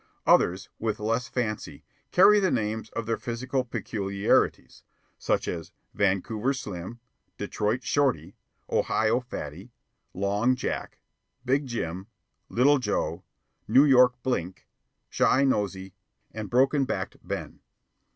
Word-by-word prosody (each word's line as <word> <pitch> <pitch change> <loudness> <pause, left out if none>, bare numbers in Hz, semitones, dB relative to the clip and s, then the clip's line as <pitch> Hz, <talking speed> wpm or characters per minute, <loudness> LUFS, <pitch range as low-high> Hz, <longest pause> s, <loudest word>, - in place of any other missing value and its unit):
Others, 90 +2 +3
with 110 -2 -2
less 115 +3 -1
fancy, 110 -4 -4 0.3
carry 205 +3 +7
the 190 -2 +2
names 110 -3 -2
of 115 - -4
their 115 0 -1
physical 130 +2 -2
peculiarities, 100 -4 -1 0.4
such - - 0
as: 85 -2 -5 0.2
Vancouver 105 +6 0
Slim, 100 -1 -7 0.4
Detroit 110 +4 -2
Shorty, 120 - 0 0.3
Ohio 110 +2 +1
Fatty, 95 - -8 0.4
Long 100 +6 +1
Jack, - - -4 0.5
Big 135 +2 +1
Jim, 95 -5 -4 0.4
Little 140 +4 +4
Joe, 105 -5 -2 0.4
New 135 +3 +6
York 125 -3 +6
Blink, 95 -8 -2 0.5
Chi 135 - +4
Nosey, 95 -7 -1 0.4
and 110 -2 -6
Broken 135 +3 +3
backed 95 -7 -4
Ben. - - -6
115 Hz, 110 wpm, -27 LUFS, 100-130 Hz, 0.5 s, carry